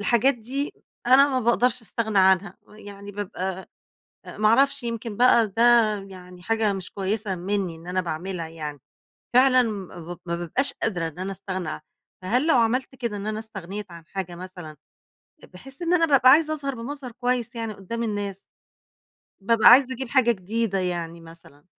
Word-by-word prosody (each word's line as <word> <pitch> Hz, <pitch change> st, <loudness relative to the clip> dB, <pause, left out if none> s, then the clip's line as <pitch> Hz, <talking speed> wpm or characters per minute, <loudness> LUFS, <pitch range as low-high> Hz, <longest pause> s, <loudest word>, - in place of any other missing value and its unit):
الحاجات 235 Hz, +6 st, +3 dB
دي، 260 Hz, +5 st, -4 dB, 0.3 s
أنا 275 Hz, +3 st, +6 dB
ما 260 Hz, -2 st, 0 dB
باقدرش 240 Hz, +1 st, +1 dB
أستغنى 220 Hz, -2 st, -1 dB
عنها. 190 Hz, 0 st, +3 dB
ويعني 205 Hz, -1 st, -12 dB
بابقى 190 Hz, -2 st, -5 dB, 0.6 s
أ -, -, -10 dB
ما 215 Hz, 0 st, +3 dB
أعرفش، 275 Hz, +3 st, +3 dB
يمكن 230 Hz, -2 st, -5 dB
بقى 240 Hz, -2 st, +5 dB
ده 225 Hz, +4 st, -1 dB, 0.5 s
يعني 180 Hz, -1 st, -12 dB
حاجة 220 Hz, +1 st, +1 dB
مش 190 Hz, -2 st, -6 dB
كويسة 200 Hz, 0 st, -2 dB
مني 185 Hz, -1 st, -2 dB
إن 165 Hz, +2 st, -15 dB
أنا 185 Hz, +1 st, -1 dB
باعملها 170 Hz, 0 st, -5 dB
يعني 150 Hz, -3 st, -7 dB, 0.5 s
فعلًا 255 Hz, 0 st, +6 dB
ما 180 Hz, -6 st, -6 dB
ما 170 Hz, -, -2 dB
بابقاش 175 Hz, -, +1 dB
قادرة 175 Hz, -7 st, -2 dB
إن 160 Hz, +2 st, -10 dB
أنا 190 Hz, +1 st, -3 dB
أستغنى 190 Hz, -3 st, -5 dB
عن -, -, -5 dB, 0.4 s
فهل 245 Hz, -, 0 dB
لو 325 Hz, -, +4 dB
عمَلّت 250 Hz, +3 st, +1 dB
كده 235 Hz, -5 st, -4 dB
إن 200 Hz, +1 st, -5 dB
أنا 215 Hz, 0 st, -2 dB
استغنيت 200 Hz, -2 st, -8 dB
عن 170 Hz, -1 st, -11 dB
حاجة 185 Hz, -3 st, -5 dB
مثلًا، 180 Hz, -3 st, -9 dB, 0.8 s
بحيث 270 Hz, -, -11 dB
إن 345 Hz, +1 st, +1 dB
أنا 330 Hz, -2 st, +4 dB
بابقى 270 Hz, -3 st, +6 dB
عايزة 310 Hz, +2 st, +5 dB
أظهر 275 Hz, -3 st, -4 dB
بمظهر 255 Hz, +1 st, -7 dB
كويس، 245 Hz, 0 st, -2 dB
يعني 225 Hz, -1 st, -3 dB
قُدام 210 Hz, +4 st, -6 dB
الناس. 205 Hz, -3 st, -3 dB, 1.0 s
بابقى 220 Hz, +2 st, +5 dB
عايزة، 260 Hz, +1 st, +7 dB
أجيب 260 Hz, 0 st, -6 dB
حاجة 245 Hz, -2 st, +3 dB
جديدة 210 Hz, +1 st, -2 dB
يعني 170 Hz, -2 st, -3 dB
مثلًا. 165 Hz, -3 st, -16 dB
210 Hz, 170 wpm, -24 LUFS, 185-245 Hz, 1.0 s, عايزة